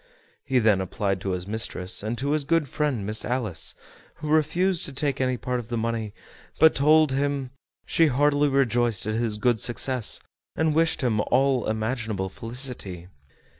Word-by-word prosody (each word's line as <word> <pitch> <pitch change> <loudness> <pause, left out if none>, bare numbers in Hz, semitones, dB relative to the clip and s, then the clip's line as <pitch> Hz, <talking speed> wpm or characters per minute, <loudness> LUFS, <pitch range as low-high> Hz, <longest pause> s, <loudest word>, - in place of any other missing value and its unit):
He 135 -2 0
then 110 -5 +3
applied 95 +1 -2
to 100 - -3
his 90 -1 -2
mistress, 100 -3 -2
and 110 +3 -3
to 140 +4 -1
his 150 -1 +1
good 165 +1 +1
friend 135 -7 -1
Miss 105 +1 -1
Alice, 120 -9 -2 0.4
who 150 - -6
refused 170 +4 +2
to 140 - -6
take 140 -1 -1
any 130 -1 +1
part 125 0 -2
of 115 - -8
the 120 - -2
money, 115 -2 -2 0.5
but 160 0 +7
told 155 +1 +4
him 140 -1 -1 0.3
she 165 - +3
heartily 145 +1 +2
rejoiced 120 -6 +1
at 110 - -1
his 110 -1 -1
good 115 +1 +1
success, 125 0 0 0.4
and 160 -1 +1
wished 165 +1 +2
him 110 -4 +2
all 135 -1 +2
imaginable 110 -3 -2
felicity. 115 -6 -5
125 Hz, 170 wpm, -25 LUFS, 110-140 Hz, 0.5 s, but